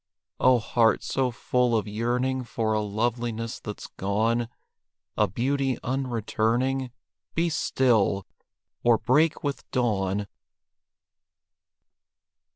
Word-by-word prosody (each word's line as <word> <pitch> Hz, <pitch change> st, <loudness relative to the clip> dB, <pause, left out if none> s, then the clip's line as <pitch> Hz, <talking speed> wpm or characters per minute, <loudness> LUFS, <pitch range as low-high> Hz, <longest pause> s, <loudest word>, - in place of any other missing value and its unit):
Oh, 130 Hz, 0 st, +5 dB
heart, 115 Hz, 0 st, +2 dB
so 130 Hz, -1 st, 0 dB
full 125 Hz, 0 st, +1 dB
of 110 Hz, -, -2 dB
yearning 125 Hz, +4 st, -1 dB
For 115 Hz, -2 st, -1 dB
a 110 Hz, -, +1 dB
loveliness 115 Hz, +2 st, -2 dB
that's 105 Hz, -, -7 dB
gone, 115 Hz, +4 st, 0 dB, 0.7 s
A -, -, +3 dB
beauty 135 Hz, 0 st, 0 dB
unreturning, 125 Hz, 0 st, 0 dB, 0.5 s
Be 170 Hz, +1 st, +2 dB
still! 115 Hz, -, +2 dB, 0.6 s
or 120 Hz, -1 st, +5 dB
break 150 Hz, +8 st, +2 dB
with 140 Hz, -1 st, -4 dB
dawn! 105 Hz, -5 st, 0 dB
120 Hz, 95 wpm, -26 LUFS, 110-130 Hz, 0.7 s, Oh